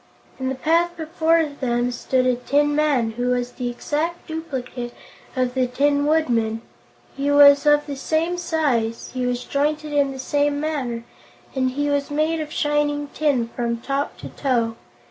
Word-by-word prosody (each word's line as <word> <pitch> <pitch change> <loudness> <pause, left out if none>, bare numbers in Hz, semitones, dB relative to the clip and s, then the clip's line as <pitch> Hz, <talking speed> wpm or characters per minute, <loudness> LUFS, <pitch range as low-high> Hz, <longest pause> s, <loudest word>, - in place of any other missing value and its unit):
In 260 0 -1
the 265 - -2
path 335 +5 +1
before 325 0 +2
them 245 -4 -1
stood 255 +1 0
a 255 - +4
tin 290 +4 +1
man 285 -7 +2
who 245 +2 -2
was 245 0 0
the 245 -1 -4
exact 305 +7 -3
duplicate 260 -7 -5 0.4
of 255 -1 0
the 255 -1 +1
Tin 285 +3 +1
Woodman. 230 -8 +1 0.5
He 280 +1 -1
was 285 0 +7
of 295 0 +5
the 285 - -5
same 325 +5 -1
size, 260 -10 -1
he 255 -1 -1
was 250 0 -1
jointed 300 +2 -1
in 285 -1 +2
the 265 - -7
same 285 +2 0
manner, 270 -7 -2 0.5
and 260 -1 +1
he 290 +3 -1
was 285 -1 0
made 310 +2 0
of 305 -1 -6
shining 295 -1 0
tin 275 -7 0
from 235 -1 -2
top 275 +4 -3
to - - -8
toe. 235 -5 0
285 Hz, 165 wpm, -22 LUFS, 250-300 Hz, 0.5 s, was